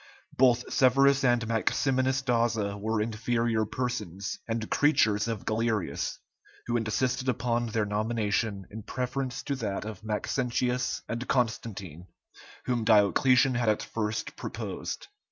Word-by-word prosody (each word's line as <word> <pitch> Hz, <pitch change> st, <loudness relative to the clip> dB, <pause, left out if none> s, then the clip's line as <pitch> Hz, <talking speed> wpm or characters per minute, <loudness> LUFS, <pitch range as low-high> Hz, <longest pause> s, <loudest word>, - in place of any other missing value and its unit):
Both 125 Hz, -1 st, +3 dB
Severus 135 Hz, +1 st, +4 dB
and 120 Hz, -2 st, +3 dB
Maximinus 130 Hz, +3 st, +1 dB
Daza 115 Hz, -5 st, +1 dB
were 110 Hz, 0 st, 0 dB
inferior 115 Hz, 0 st, 0 dB
persons, 105 Hz, -6 st, -3 dB
and 115 Hz, -1 st, -2 dB
creatures 110 Hz, -8 st, +3 dB
of 115 Hz, -3 st, -4 dB
Galerius, 110 Hz, -3 st, -1 dB, 0.5 s
who 120 Hz, -, -1 dB
insisted 125 Hz, +3 st, 0 dB
upon 120 Hz, -1 st, 0 dB
their 110 Hz, -1 st, 0 dB
nomination 105 Hz, -1 st, -1 dB
in 110 Hz, +2 st, -7 dB
preference 125 Hz, +3 st, -3 dB
to 140 Hz, -, -2 dB
that 105 Hz, -5 st, -3 dB
of 110 Hz, -1 st, -7 dB
Maxentius 125 Hz, +3 st, -1 dB
and 120 Hz, +2 st, -4 dB
Constantine, 100 Hz, -, -2 dB, 0.6 s
whom 120 Hz, -2 st, 0 dB
Diocletian 125 Hz, +5 st, +4 dB
had 120 Hz, -2 st, +1 dB
at 105 Hz, -, +1 dB
first 110 Hz, -1 st, -3 dB
proposed. -, -, -5 dB
115 Hz, 120 wpm, -28 LUFS, 110-125 Hz, 0.6 s, Severus